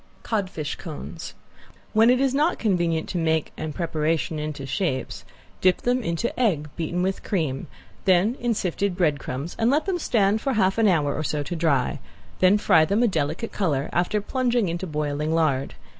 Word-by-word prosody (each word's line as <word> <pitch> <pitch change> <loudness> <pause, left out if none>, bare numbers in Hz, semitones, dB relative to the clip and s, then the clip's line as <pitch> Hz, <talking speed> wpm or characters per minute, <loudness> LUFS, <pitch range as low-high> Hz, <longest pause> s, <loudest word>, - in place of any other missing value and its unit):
~CODFISH 185 -9 -2
CONES~ 155 -3 -8 0.6
When 225 +1 +5
it 250 0 +4
is 270 -1 +2
not 300 +5 +2
convenient 170 -6 0
to 180 - -2
make 160 -1 0
and 155 -2 -5
preparation 155 -3 -1
into 150 -2 -4
shapes, 135 - -2 0.4
dip 185 -1 +3
them 250 +1 +1
into 190 +4 -2
egg 165 - +1
beaten 175 +2 -2
with 190 +1 -1
cream, 155 -10 -2 0.4
then 190 +4 +4
in 240 -1 0
sifted 190 0 -1
breadcrumbs 150 -3 -1
and 225 +1 +3
let 295 +4 +2
them 375 -3 -1
stand 215 - +2
for 270 - 0
half 195 -1 +2
an 225 - +5
hour 150 -7 +2
or - - -2
so 150 -1 -1
to 160 +5 -4
dry; 155 -6 +1 0.4
then 185 +2 +5
fry 160 -6 +4
them 200 +8 +2
a - - +5
delicate 160 +3 -2
color 150 -8 -1
after 180 +4 +1
plunging 240 -3 0
into 175 +3 -3
boiling 150 0 -1
lard. 140 -5 +1
175 Hz, 175 wpm, -24 LUFS, 155-215 Hz, 0.6 s, When